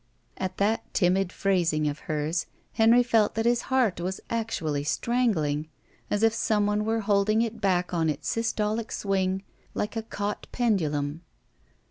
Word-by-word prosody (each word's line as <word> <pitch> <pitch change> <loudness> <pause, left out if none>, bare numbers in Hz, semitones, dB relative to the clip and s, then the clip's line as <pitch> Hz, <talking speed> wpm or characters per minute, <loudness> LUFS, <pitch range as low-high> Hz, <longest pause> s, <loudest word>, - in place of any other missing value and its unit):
At 185 -1 -4
that 210 +3 0
timid 185 0 +2
phrasing 170 -7 +1
of 145 0 -3
hers 155 +2 -1 0.3
Henry 230 +2 +5
felt 225 -4 +2
that 225 +1 0
his 240 0 +3
heart 245 -9 +2
was 185 +2 -3
actually 170 -11 -1
strangling, 160 -8 0 0.4
as 205 +1 0
if 225 0 +5
some 215 -3 +1
one 210 +1 0
were 225 +1 0
holding 210 +2 +2
it 225 -1 -5
back 180 -2 +1
on 165 -2 +1
its 150 - -3
systolic 220 0 -1
swing, 190 -1 -1 0.3
Uke 210 - -2
a - - 0
caught 205 -2 -4
pendulum. 160 - 0
200 Hz, 150 wpm, -27 LUFS, 175-225 Hz, 0.4 s, Henry